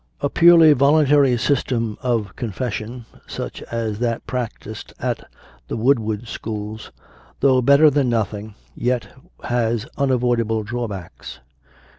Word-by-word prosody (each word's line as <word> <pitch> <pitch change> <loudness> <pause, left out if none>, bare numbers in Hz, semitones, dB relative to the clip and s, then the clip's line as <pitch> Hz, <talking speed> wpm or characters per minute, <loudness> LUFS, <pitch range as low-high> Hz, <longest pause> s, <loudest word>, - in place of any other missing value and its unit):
A - - -1
purely 165 -2 +7
volun 145 +2 +4
tary 140 -3 +4
system 120 -3 0
of 115 -6 -1
Confession, 115 +1 -5 0.2
such - - -6
as 110 -3 -2
they 115 -1 0
practised 115 -3 -6
at - - -3 0.4
the - - -4
Woodard 110 -2 +1
schools, 110 -1 -6 0.5
though 130 -2 +4
better 140 +4 +6
than 140 -3 +1
nothing, 110 -2 -2 0.2
yet 125 0 -1 0.3
has 115 -2 0
unavoidable 120 -5 +1
drawbacks. 105 -5 -6
120 Hz, 115 wpm, -21 LUFS, 110-130 Hz, 0.5 s, purely